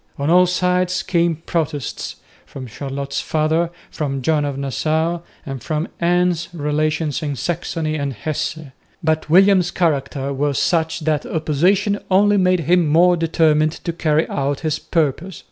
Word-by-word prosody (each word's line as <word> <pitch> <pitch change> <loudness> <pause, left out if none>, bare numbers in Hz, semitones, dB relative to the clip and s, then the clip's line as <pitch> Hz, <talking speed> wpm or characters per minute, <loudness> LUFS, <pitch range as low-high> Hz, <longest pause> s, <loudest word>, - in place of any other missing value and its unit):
On 140 +3 0
all 180 +1 +6
sides 180 +1 0
came 170 -2 +1
protests 155 -3 -3 0.3
from 135 -2 -8
Charlotte's 140 +3 -4
father, 160 +2 0 0.2
from 135 -3 -3
John 155 -1 +2
of 140 -2 -3
Nassau, 155 +5 -1 0.3
and 135 -3 -6
from 155 +1 -2
Anne's 175 -1 +1
relations 150 -1 -1
in 145 -2 -3
Saxony 160 +1 -2
and 140 -2 -2
Hesse. 155 +7 -3 0.5
But 155 -1 0
William's 185 +1 +5
character 140 -5 -1
was 140 0 -1
such 160 -1 0
that 155 -1 -1
opposition 185 +7 +1
only 205 +2 +4
made 185 -2 +3
him 170 +1 +3
more 175 +4 +5
determined 155 -2 +2
to 170 - -5
carry 160 -1 +1
out 140 0 -2
his 155 -1 -1
purpose. 165 +2 -1
160 Hz, 145 wpm, -20 LUFS, 145-175 Hz, 0.5 s, all